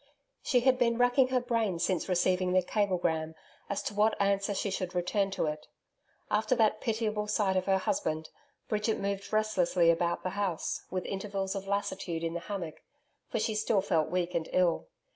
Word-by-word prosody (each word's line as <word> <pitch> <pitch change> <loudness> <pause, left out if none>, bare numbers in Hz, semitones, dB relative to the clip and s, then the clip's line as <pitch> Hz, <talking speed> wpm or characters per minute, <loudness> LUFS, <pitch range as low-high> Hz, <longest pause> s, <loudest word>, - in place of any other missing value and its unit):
She 250 -3 +2
had 255 0 +3
been 235 -2 +2
racking 245 +2 +4
her 255 0 +2
brain 230 -7 0
since 175 +1 -1
receiving 180 0 +2
the 185 0 +4
cablegram 175 -6 0 0.3
as 200 - -2
to - - -3
what 210 +2 +2
answer 200 0 +1
she 200 - -1
should 185 -1 -3
return 195 +3 +1
to 195 - -1
it. 150 0 -4 0.6
After 215 +4 +2
that 215 -2 +2
pitiable 215 -3 -1
sight 205 -2 +1
of 185 0 0
her 195 0 +4
husband, 185 - -2 0.4
Bridget 215 +1 0
moved 200 0 -3
restlessly 185 -6 +3
about 170 +1 0
the 185 - -2
house, 195 -4 -2
with 185 0 -3
intervals 195 -1 -3
of 195 -1 -5
lassitude 195 -4 -2
in 165 0 -1
the 170 - -2
hammock, 175 -4 -6 0.5
for - - -2
she 220 0 0
still 215 -1 +2
felt 160 -3 +1
weak 180 0 -1
and 160 - -2
ill. 180 -2 +2
195 Hz, 180 wpm, -30 LUFS, 180-215 Hz, 0.6 s, racking